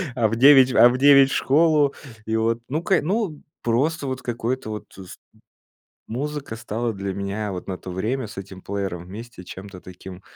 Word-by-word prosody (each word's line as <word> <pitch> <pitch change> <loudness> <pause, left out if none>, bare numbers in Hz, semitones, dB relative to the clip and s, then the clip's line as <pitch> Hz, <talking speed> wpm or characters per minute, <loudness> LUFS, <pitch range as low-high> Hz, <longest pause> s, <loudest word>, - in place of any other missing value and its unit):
а 115 -3 +2
в 115 - -2
9, 130 0 +7
а 120 - +7
в 125 - -1
9 140 0 +6
в - - -1
школу. 150 -1 +3 0.3
И 110 - -1
вот, 115 +1 0
ну 155 +5 -1
к 190 0 +2
ну, 185 -4 -2 0.2
просто 140 +5 0
вот 130 -1 -4
какое-то 120 0 -3
вот 105 - -6
с 95 -2 -11 0.9
музыка 140 +1 -4
стала 115 0 -3
для 100 -1 -4
меня 100 +2 -3
вот 90 - -6
на 95 -1 -5
то 95 - -9
время 110 +7 -2
с 110 - -12
этим 95 -1 -9
плеером 95 -3 -4
вместе 110 0 -10
чем-то 95 +1 -10
таким 90 0 -11
115 Hz, 185 wpm, -23 LUFS, 100-135 Hz, 0.9 s, 9